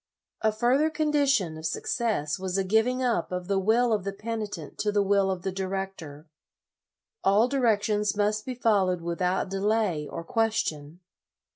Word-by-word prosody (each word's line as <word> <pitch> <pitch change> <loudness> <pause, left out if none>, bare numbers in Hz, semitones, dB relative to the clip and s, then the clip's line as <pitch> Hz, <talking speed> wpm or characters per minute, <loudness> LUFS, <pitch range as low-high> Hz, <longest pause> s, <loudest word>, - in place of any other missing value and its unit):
A 220 - +3
further 250 +8 +2
condition 285 - +1
of 160 - -8
success 170 - -1
was 190 0 -2
a 195 - +1
giving 220 +6 +1
up 235 -10 0
of 180 -1 -4
the 195 -1 +1
will 225 +4 +3
of 205 -3 0
the 200 - -3
penitent 210 -6 -6
to 210 - +1
the 205 -1 +2
will 195 0 +2
of 185 -2 -3
the 190 - -1
director. 190 -5 -5 1.0
All 205 +5 +4
directions 210 -5 +1
must 210 +1 +1
be 255 +1 -5
followed 195 -7 +2
without 180 +3 -1
delay 195 -5 0
or 165 - -6
question. 175 -8 -1
205 Hz, 155 wpm, -27 LUFS, 185-225 Hz, 1.0 s, All